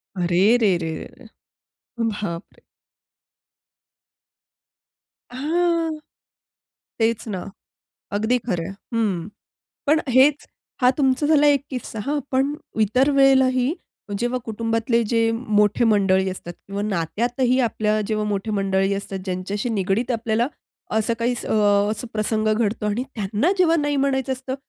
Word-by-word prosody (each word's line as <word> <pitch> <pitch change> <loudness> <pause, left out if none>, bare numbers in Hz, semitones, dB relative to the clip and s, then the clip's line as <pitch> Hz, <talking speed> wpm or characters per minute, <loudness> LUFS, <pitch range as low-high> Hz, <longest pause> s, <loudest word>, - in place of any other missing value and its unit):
अरे 175 -1 0 0.2
रे 205 -6 +3
रे 160 - -2 0.3
रे - - -16 0.8
बापरे! 200 -4 -6 2.7
हां. 330 +4 0 1.0
तेच 225 0 0
ना, 190 -4 -4 0.7
अगदी 225 +4 +2
खरं 175 -7 -1
आहे 195 - -7 0.2
हं. 195 -6 0 0.6
पण 310 +2 +4
हेच 275 +4 +4 0.4
हा 250 - +6
तुमचा 270 0 +2
झाला 295 -2 +5
एक 285 -1 +4
किस्सा 250 -4 -6
हां. 290 +1 0
पण 270 +2 +1 0.3
इतर 255 +7 +3
वेळेलाही 265 0 +4 0.5
जेव्हा 240 +1 0
कुटुंबातले 230 +1 0
जे 230 -1 +2
मोठे 215 -1 +1
मंडळी 190 -3 +3
असतात 175 -2 -7
किंवा 200 +1 -4
नात्यातही 240 +7 0
आपल्या 215 -2 0
जेव्हा 215 -1 -1
मोठे 205 +1 -2
मंडळी 195 -1 +1
असतात, 195 -1 -5
ज्यांच्याशी 195 +4 -3
निगडित 215 +4 0
आपल्याला 230 +1 0 0.4
असं 220 +1 +1
काही 240 +2 +1
अ, - - 0 0.4
असा 220 +3 -5
प्रसंग 215 0 0
घडतो 215 -1 -1
आणि 210 +4 0
त्यांना 210 - 0
जेव्हा 335 -2 +4
नाही 290 0 0
म्हणायचं 265 -1 0
असतं 260 +1 -5
225 Hz, 125 wpm, -22 LUFS, 205-260 Hz, 2.7 s, हा